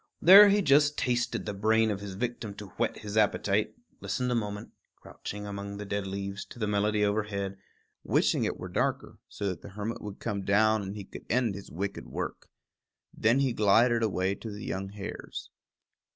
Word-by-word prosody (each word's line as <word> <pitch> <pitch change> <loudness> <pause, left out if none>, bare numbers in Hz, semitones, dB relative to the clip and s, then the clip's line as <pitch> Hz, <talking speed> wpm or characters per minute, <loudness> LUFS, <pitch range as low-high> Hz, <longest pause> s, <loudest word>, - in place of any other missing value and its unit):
There 200 +4 +10
he 205 0 +3
just 145 0 +4
tasted 125 -1 0
the 105 - -3
brain 110 +2 +2
of 100 - -3
his 100 -2 -7
victim 115 -2 -4
to 105 -2 -9
whet 115 +4 -2
his 105 0 -5
appetite, 105 -1 +2 0.2
listened 125 -1 -2
a - - +2
moment, 105 -3 -3 0.2
crouching 105 0 -8
among 100 0 -6
the 105 - -6
dead 100 0 -3
leaves, 100 +1 -4
to - - -13
the 110 - -1
melody 105 0 +1
overhead, 100 -2 -2 0.4
wishing - - +2
it - - -1
were - - -6
darker, - - -2
so 100 - -4
that 90 - -5
the - - -10
hermit 105 +3 -5
would 105 -1 -7
come 105 -3 -3
down 110 +2 +3
and 100 +1 -6
he 105 - -6
could - - -11
end 120 -3 +2
his 100 +1 -9
wicked 100 +4 -4
work. - - -5 0.7
Then 115 +5 +2
he 135 -3 +1
glided 115 +3 +4
away 95 -3 +1
to 110 +3 -8
the 105 +1 -7
young 95 +1 -3
hares. 100 0 -7
105 Hz, 190 wpm, -29 LUFS, 100-115 Hz, 0.7 s, There